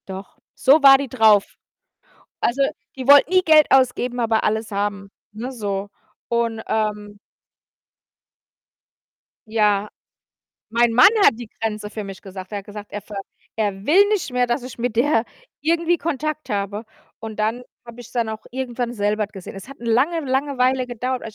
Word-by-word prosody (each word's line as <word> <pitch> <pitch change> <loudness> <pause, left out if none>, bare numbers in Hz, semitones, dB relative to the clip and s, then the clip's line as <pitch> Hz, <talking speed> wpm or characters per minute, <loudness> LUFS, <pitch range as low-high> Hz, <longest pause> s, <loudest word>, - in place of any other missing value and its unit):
Doch, 190 0 -9 0.2
so 285 +4 +4
war 270 -1 +9
die 280 0 -4
drauf. 220 -5 +4 1.0
Also, 250 +4 0 0.4
die 260 -2 -6
wollte 285 +3 +7
nie 370 0 +4
Geld 310 -3 +6
ausgeben, 250 -2 +2
aber 225 -1 +1
alles 220 +1 -1
haben, 200 -1 -3 0.2
ne, 235 +5 -6
so. 205 -4 -4 0.4
Und, 230 -2 -1
ähm 210 -1 -2 2.3
Ja, 210 -2 +1 0.8
mein 235 +1 +2
Mann 250 +9 +8 0.2
hat - - +6
die 235 0 -9
Grenze 215 -2 -3
für 215 0 -6
mich 195 -1 -9
gesagt. 190 0 -10
Er 205 - -3
hat 195 - -14
gesagt, 205 0 -10
er 205 - -5
ver 210 +1 -11 0.4
er 205 -3 -2
will 385 +9 +5
nicht 405 -10 -1
mehr, 250 0 +1
dass 240 +2 -1
ich 250 -1 -10
mit 240 -1 -2
der 240 -1 +2 0.4
irgendwie 335 +3 +1
Kontakt 305 -1 -3
habe 205 +1 -3 0.3
und 225 -1 -7
dann 220 +4 -1 0.2
habe 235 0 -11
ich's 240 - -14
dann 235 -2 -1
auch 220 0 -6
irgendwann 245 -2 -4
selber 210 -1 -1
gesehen. 195 -3 -10
Es 195 - -10
hat 275 - -11
'ne 235 -1 -2
lange, 300 +9 +2
lange 275 0 -1
Weile 255 0 +2
gedauert 250 +1 -3
230 Hz, 165 wpm, -21 LUFS, 210-260 Hz, 2.3 s, war